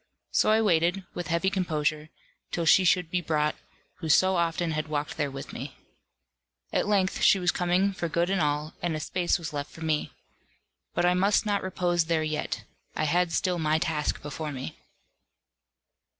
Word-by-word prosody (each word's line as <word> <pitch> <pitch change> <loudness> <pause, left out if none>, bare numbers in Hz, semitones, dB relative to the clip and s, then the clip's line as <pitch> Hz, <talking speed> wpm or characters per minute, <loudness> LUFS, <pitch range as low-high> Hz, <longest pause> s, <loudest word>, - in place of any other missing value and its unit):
So - - +3
I 220 +1 +4
waited, 180 0 +2
with 175 - -5
heavy 170 +3 +1
composure, 155 -5 -1 0.4
till 170 - -2
she 185 +4 +6
should 180 -1 +2
be 180 - +1
brought, 150 -2 0 0.4
who 165 -3 -4
so 185 +5 +5
often 170 -1 0
had 155 0 -2
walked 150 -1 -3
there 145 -2 -1
with 135 0 -8
me. 130 +2 -7 1.0
At - - +1
length 195 -3 +1
she - - +6
was 180 -2 +2
coming 185 +2 +1
for 170 -2 -3
good 170 +3 0
and 195 - +1
all, 150 +1 -1
and 170 -2 -1
a - - -3
space 175 +4 0
was 170 -2 -6
left 145 0 -4
for 160 - -14
me. 155 -2 -1 0.8
But - - +2
I 180 - +4
must 195 +4 +2
not 205 -1 +1
repose 175 -2 0
there 160 -1 +1
yet; 155 -1 -3 0.3
I - - -1
had 175 +3 +2
still 180 0 0
my 155 0 +2
task 160 -2 -1
before 150 +1 -5
me. 130 - -6
170 Hz, 180 wpm, -27 LUFS, 155-180 Hz, 1.0 s, she